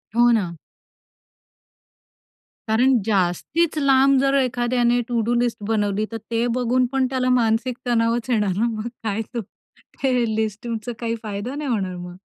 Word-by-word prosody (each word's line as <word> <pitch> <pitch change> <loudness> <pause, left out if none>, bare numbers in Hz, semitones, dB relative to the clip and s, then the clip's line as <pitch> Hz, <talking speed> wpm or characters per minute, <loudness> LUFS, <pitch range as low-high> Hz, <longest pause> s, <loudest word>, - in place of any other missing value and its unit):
हो 240 +1 +5
ना. 210 -7 +1 2.2
कारण 250 +4 +4
जास्तीच 220 - 0
लांब 275 -1 +4
जर 275 0 +2
एखाद्याने 245 -1 +1
टू-डू 235 -1 0
लिस्ट 240 -2 0
बनवली 210 -1 0
तर 225 - -3
ते 230 +1 +1
बघून 250 +1 +2
पण 265 -1 +2
त्याला 255 -1 0
मानसिक 235 +2 0
तणावच 235 +1 +1
येणार 210 -6 +1
ना. 225 - +2
मग 220 0 -4 0.2
काय 215 0 -1
तो 235 - -2
ते 260 +5 -6 0.2
लिस्टिंगचा 220 +1 -2 0.2
तुमचा 230 - -11
काही 230 -1 -2
फायदा 210 +5 -4
नाही 290 -1 -4
होणार 195 -6 -1
मग. 175 0 -8
235 Hz, 145 wpm, -22 LUFS, 215-255 Hz, 2.2 s, हो